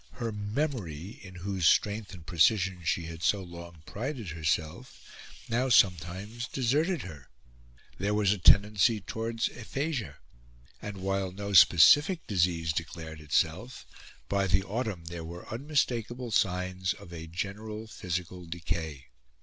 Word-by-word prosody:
Her 115 Hz, -3 st, -3 dB
memory, 105 Hz, -, -3 dB
in 95 Hz, -2 st, -11 dB
whose 90 Hz, -1 st, 0 dB
strength 105 Hz, 0 st, +2 dB
and 90 Hz, -4 st, -11 dB
precision 90 Hz, +2 st, +2 dB
she 85 Hz, +1 st, 0 dB
had 80 Hz, 0 st, -8 dB
so 95 Hz, +3 st, +2 dB
long 85 Hz, -2 st, -11 dB
prided 120 Hz, -, -5 dB
herself, 80 Hz, +8 st, -2 dB, 0.5 s
now 125 Hz, +3 st, 0 dB
sometimes 100 Hz, +3 st, +2 dB
deserted 150 Hz, +9 st, 0 dB
her; 75 Hz, -8 st, -10 dB, 0.7 s
there 100 Hz, +2 st, 0 dB
was 105 Hz, -1 st, +3 dB
a 105 Hz, -, -5 dB
tendency 105 Hz, +4 st, +5 dB
towards 115 Hz, +3 st, -2 dB
aphasia; 135 Hz, +1 st, -4 dB, 0.6 s
and, 105 Hz, -1 st, -6 dB
while 95 Hz, 0 st, -1 dB
no 100 Hz, +2 st, -5 dB
specific 145 Hz, -, +7 dB
disease 85 Hz, -4 st, +1 dB
declared 80 Hz, -1 st, -5 dB
itself, 80 Hz, -, -1 dB, 0.4 s
by 100 Hz, -1 st, +1 dB
the 95 Hz, +1 st, +2 dB
autumn 100 Hz, -4 st, -3 dB
there 85 Hz, 0 st, -6 dB
were 85 Hz, +2 st, -9 dB
unmistakable 120 Hz, -2 st, -1 dB
signs 90 Hz, -2 st, 0 dB
of 85 Hz, -, -13 dB
a 80 Hz, -1 st, -7 dB
general 105 Hz, +5 st, -5 dB
physical 90 Hz, -3 st, -5 dB
decay. 80 Hz, -4 st, -4 dB
95 Hz, 130 wpm, -29 LUFS, 85-110 Hz, 0.7 s, specific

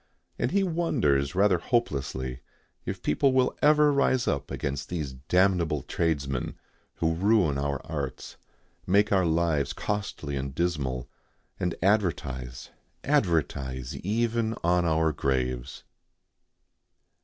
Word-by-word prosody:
And -, -, +1 dB
he 200 Hz, 0 st, +2 dB
wonders 115 Hz, -, +1 dB
rather 95 Hz, -2 st, +4 dB
hopelessly 65 Hz, -, -1 dB, 0.5 s
if -, -, -4 dB
people 130 Hz, -, +2 dB
will 130 Hz, -1 st, +2 dB
ever 150 Hz, 0 st, +5 dB
rise 130 Hz, -2 st, +2 dB
up 70 Hz, 0 st, -1 dB
against 70 Hz, 0 st, -4 dB
these 75 Hz, -7 st, -3 dB
damnable 85 Hz, +1 st, +1 dB
tradesmen 70 Hz, -6 st, -1 dB, 0.4 s
who 80 Hz, 0 st, +1 dB
ruin 90 Hz, -5 st, +2 dB
our 70 Hz, -1 st, -1 dB
arts, 70 Hz, -4 st, -5 dB, 0.5 s
make 100 Hz, +3 st, +3 dB
our 95 Hz, -3 st, +3 dB
lives 80 Hz, -4 st, +1 dB
costly 100 Hz, -8 st, -3 dB
and 70 Hz, 0 st, -4 dB
dismal, 70 Hz, -8 st, -1 dB, 0.5 s
and 90 Hz, -, -1 dB
advertise, 70 Hz, -, -1 dB, 0.3 s
advertise 75 Hz, -, 0 dB
even 115 Hz, +2 st, 0 dB
on 90 Hz, +1 st, +3 dB
our 80 Hz, -1 st, +2 dB
graves. 65 Hz, -3 st, -2 dB
80 Hz, 110 wpm, -27 LUFS, 70-105 Hz, 0.5 s, ever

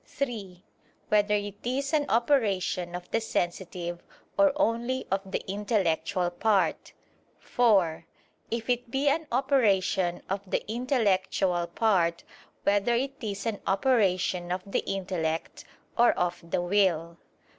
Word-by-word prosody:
(3) 205 Hz, -9 st, -5 dB, 0.5 s
Whether 210 Hz, 0 st, +3 dB
it 205 Hz, 0 st, -4 dB
is 275 Hz, +4 st, -2 dB
an 295 Hz, -2 st, +2 dB
operation 205 Hz, -8 st, +1 dB
of 180 Hz, 0 st, -8 dB
the 225 Hz, -, +1 dB
sensitive, 175 Hz, -3 st, -3 dB, 0.3 s
or 295 Hz, -1 st, +5 dB
only 255 Hz, -2 st, 0 dB
of 195 Hz, 0 st, +1 dB
the -, -, -2 dB
intellectual 190 Hz, -3 st, 0 dB
part? 200 Hz, +2 st, +1 dB, 0.4 s
(4) 190 Hz, -9 st, +2 dB, 0.4 s
If 230 Hz, -1 st, -3 dB
it 245 Hz, -1 st, 0 dB
be 275 Hz, +3 st, +1 dB
an 315 Hz, +2 st, 0 dB
operation 205 Hz, -9 st, +2 dB
of 195 Hz, +1 st, -2 dB
the -, -, -1 dB
intellectual 200 Hz, -7 st, +1 dB
part, 170 Hz, -3 st, +1 dB, 0.4 s
whether 205 Hz, +4 st, +2 dB
it 270 Hz, +3 st, -1 dB
is 200 Hz, -2 st, -4 dB
an 225 Hz, -3 st, -2 dB
operation 190 Hz, -6 st, +1 dB
of 180 Hz, 0 st, -2 dB
the 195 Hz, -, -1 dB
intellect, 180 Hz, -4 st, -3 dB, 0.3 s
or 240 Hz, 0 st, +5 dB
of 175 Hz, -1 st, -2 dB
the 175 Hz, -, 0 dB
will? 175 Hz, -3 st, +1 dB
200 Hz, 125 wpm, -28 LUFS, 180-235 Hz, 0.5 s, or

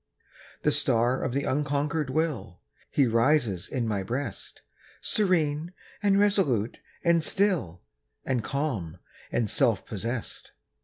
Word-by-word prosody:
The -, -, +4 dB
star 120 Hz, +3 st, +2 dB
of 130 Hz, -, -1 dB
the 140 Hz, +3 st, -1 dB
unconquered 145 Hz, +1 st, 0 dB
will, 135 Hz, -, -2 dB, 0.3 s
He 140 Hz, -, +3 dB
rises 115 Hz, -, +2 dB
in 120 Hz, -3 st, -1 dB
my 105 Hz, -3 st, 0 dB
breast, 120 Hz, +3 st, -5 dB, 0.4 s
Serene, 170 Hz, -5 st, 0 dB, 0.3 s
and 200 Hz, -1 st, +3 dB
resolute, 155 Hz, -, +2 dB, 0.2 s
and 170 Hz, -2 st, +3 dB
still, 170 Hz, -, 0 dB, 0.4 s
And 125 Hz, -4 st, 0 dB
calm, 120 Hz, -, -2 dB, 0.3 s
and 115 Hz, -, +1 dB
self 115 Hz, -4 st, +2 dB
possessed. 115 Hz, +3 st, -5 dB
135 Hz, 115 wpm, -27 LUFS, 115-155 Hz, 0.4 s, The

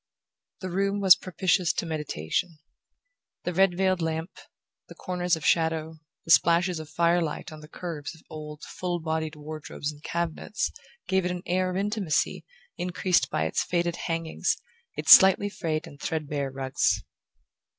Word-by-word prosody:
The 185 Hz, -1 st, -4 dB
room 195 Hz, +2 st, 0 dB
was 190 Hz, -2 st, +8 dB
propitious 185 Hz, -1 st, +1 dB
to -, -, -2 dB
meditation. 155 Hz, -, -3 dB, 0.9 s
The 180 Hz, -, -2 dB
red 185 Hz, 0 st, +3 dB
veiled 185 Hz, -2 st, +2 dB
lamp, 160 Hz, +2 st, -2 dB, 0.6 s
the -, -, -12 dB
corners 180 Hz, -1 st, -1 dB
of 160 Hz, -2 st, -8 dB
shadow, 160 Hz, -1 st, +1 dB, 0.3 s
the 165 Hz, -, -1 dB
splashes 170 Hz, +1 st, +4 dB
of 155 Hz, -1 st, -8 dB
firelight 170 Hz, -1 st, 0 dB
on 155 Hz, -, -9 dB
the 150 Hz, -, -12 dB
curves 165 Hz, -2 st, -6 dB
of 160 Hz, -, -19 dB
old 150 Hz, -1 st, -9 dB
full 175 Hz, -1 st, -3 dB
bodied 160 Hz, -1 st, -2 dB
wardrobes 150 Hz, 0 st, -6 dB
and 145 Hz, -1 st, -15 dB
cabinets, 170 Hz, +5 st, -2 dB, 0.4 s
gave 190 Hz, 0 st, +2 dB
it 180 Hz, -, -1 dB
an 180 Hz, 0 st, -4 dB
air 185 Hz, +1 st, +1 dB
of 185 Hz, -, -3 dB
intimacy 200 Hz, -5 st, 0 dB, 0.4 s
increased 180 Hz, 0 st, +1 dB
by 80 Hz, -, 0 dB
its 80 Hz, -, 0 dB
faded 175 Hz, -1 st, -1 dB
hangings, 165 Hz, -1 st, -1 dB, 0.4 s
its -, -, +2 dB
slightly 190 Hz, +2 st, +9 dB
frayed 160 Hz, -5 st, -3 dB
and 140 Hz, -, -13 dB
threadbare 150 Hz, -3 st, -2 dB
rugs. 135 Hz, 0 st, 0 dB
170 Hz, 150 wpm, -27 LUFS, 155-180 Hz, 0.9 s, slightly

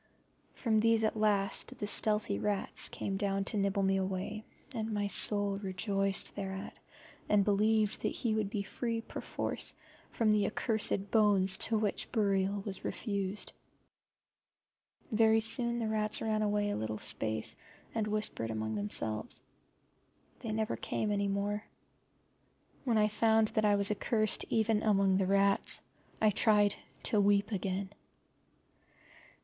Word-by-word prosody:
From 220 Hz, -4 st, +1 dB
these 225 Hz, 0 st, +3 dB
at 220 Hz, -, 0 dB
last 205 Hz, -2 st, 0 dB
the 205 Hz, -, -4 dB
stealthy 210 Hz, -, +1 dB
rats 205 Hz, -, 0 dB
came 195 Hz, -1 st, -4 dB
down 195 Hz, -1 st, -1 dB
to 215 Hz, -, -2 dB
nibble 200 Hz, 0 st, 0 dB
me 195 Hz, 0 st, +2 dB
away, 190 Hz, +3 st, -4 dB, 0.3 s
and 225 Hz, -2 st, -4 dB
my 205 Hz, -1 st, -1 dB
soul 205 Hz, 0 st, +4 dB
rejoiced 195 Hz, 0 st, -2 dB
thereat 190 Hz, -1 st, -6 dB, 0.5 s
and 205 Hz, -1 st, +4 dB
believed 215 Hz, +1 st, +1 dB
that -, -, 0 dB
he 230 Hz, -3 st, -2 dB
would 215 Hz, -2 st, -1 dB
be 205 Hz, -1 st, -3 dB
free 230 Hz, +3 st, -3 dB
perforce -, -, -4 dB, 0.3 s
from 220 Hz, -2 st, +1 dB
the 210 Hz, -1 st, +2 dB
accursed 210 Hz, -3 st, 0 dB
bones 200 Hz, -4 st, +3 dB
to 225 Hz, -, +2 dB
which 210 Hz, -2 st, -2 dB
burial 200 Hz, -2 st, 0 dB
was 195 Hz, -2 st, -5 dB
refused. 200 Hz, -2 st, -3 dB, 1.6 s
Very 220 Hz, 0 st, +4 dB
soon 235 Hz, +2 st, +5 dB
the 230 Hz, -2 st, -2 dB
rats 215 Hz, -1 st, 0 dB
ran 215 Hz, -1 st, -1 dB
away 205 Hz, -1 st, 0 dB
a -, -, -2 dB
little 110 Hz, 0 st, -4 dB
space 110 Hz, +1 st, -2 dB, 0.4 s
and 220 Hz, -2 st, -1 dB
whispered 210 Hz, -, -2 dB
among 110 Hz, 0 st, -3 dB
themselves. 110 Hz, -, -2 dB, 1.0 s
They 230 Hz, -4 st, -5 dB
never 220 Hz, +1 st, -2 dB
came 210 Hz, -, -2 dB
any 200 Hz, -1 st, 0 dB
more. 200 Hz, +1 st, -2 dB, 1.2 s
When 235 Hz, -4 st, +1 dB
I 210 Hz, 0 st, +4 dB
found 220 Hz, 0 st, +2 dB
that 215 Hz, -, 0 dB
I 205 Hz, -1 st, +4 dB
was 200 Hz, 0 st, +5 dB
accursed 215 Hz, 0 st, 0 dB
even 220 Hz, -1 st, +1 dB
among 195 Hz, -3 st, +2 dB
the 190 Hz, -1 st, 0 dB
rats 200 Hz, 0 st, +4 dB, 0.4 s
I 215 Hz, -1 st, +3 dB
tried 205 Hz, -1 st, +3 dB, 0.3 s
to 215 Hz, -4 st, +2 dB
weep 205 Hz, +1 st, +2 dB
again. 195 Hz, 0 st, -3 dB
205 Hz, 140 wpm, -31 LUFS, 195-220 Hz, 1.6 s, soon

